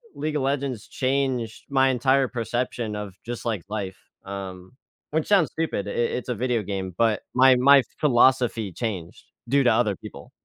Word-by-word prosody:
League 155 0 -3
of 145 - 0
Legends 135 -4 -2
changed 130 -4 -1
my 135 -1 +3
entire 130 +1 +2
perception 120 -2 -3
of 105 -2 -6
just, 120 +1 -6
like, 110 -7 -2
life, 100 -3 -4 0.3
um, 95 -1 -7 0.4
which 155 0 0
sounds 195 -7 +4
stupid. 155 -11 -2
It - - -4
it 120 - +1
it's 125 - -4
a 125 - 0
video 120 0 0
game, 95 -2 -4
but, 115 -2 +2
my 130 0 +6
my 135 +2 +6 0.2
philosophy 120 - +3
changed 95 -5 -5 0.3
due 140 0 +4
to 120 - +4
other 110 -4 +2
people. - - -11
120 Hz, 170 wpm, -24 LUFS, 105-135 Hz, 0.4 s, my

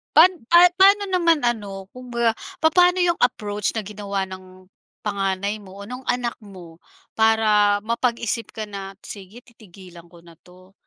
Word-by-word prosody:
Pan 325 +5 +8 0.2
pa 345 +4 +7
paano 400 +1 +5
naman 335 -4 +2
ano 200 -5 -3
kumbaga 235 -2 -2 0.2
papaano 355 +3 +4
yung 345 -1 +1
approach 210 -4 -1
na 220 - -2
ginawa 200 -1 -4
ng 185 0 -13 0.3
panganay 200 0 -2
mo 195 -2 -14
o 200 - -10
nong 250 +1 -8
anak 245 -1 -2
mo 185 -6 -14 0.4
para 215 -2 +3
mapag-isip 235 0 -2
ka 220 - -5
na, 195 -2 -8
sige 205 +4 -11
titigilan 185 -7 -16
ko 170 0 -18
na 170 -2 -18
'to. 185 +1 -20
210 Hz, 150 wpm, -22 LUFS, 195-245 Hz, 0.4 s, Pan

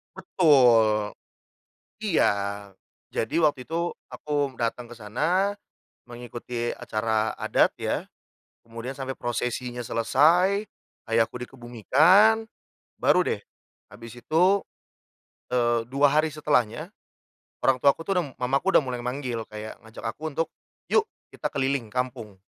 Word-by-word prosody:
Betul. 120 - +4 0.9
Iya. 210 - +2 0.8
Jadi 160 +8 -1
waktu 145 -4 +1
itu 170 +1 -1 0.2
aku 145 -3 -2
datang 120 +1 -2
kesana, 165 - -1 0.5
mengikuti 120 0 -5
acara 110 -1 -1
adat - - +2
ya. - - -3 0.5
Kemudian 115 +3 -7
sampai 135 -1 -5
prosesinya 120 0 -3
selesai, 170 - +3 0.4
Ayahku 115 +1 +1
dikebumikan, 150 - +3 0.5
baru 180 - +4
deh, 105 - -1 0.5
habis 115 +1 -12
itu, 160 +7 +1 1.1
eee, 120 -2 +2
2 145 +1 +4
hari 155 +2 +2
setelahnya, 145 -7 0 0.7
orang 135 -1 +3
tuaku 140 +5 +3
tuh 190 +2 0
du 180 - +2
Mamaku 135 +9 0
udah - - +6
mulai 125 -2 -4
manggil 125 -3 -3
kayak 105 0 -8
ngajak 110 - -11
aku 155 +7 -8
untuk, 165 +1 0 0.4
"Yuk, 445 0 +3 0.2
kita - - -5
keliling 135 -3 0
kampung" 125 -2 -4
125 Hz, 110 wpm, -25 LUFS, 115-155 Hz, 1.1 s, udah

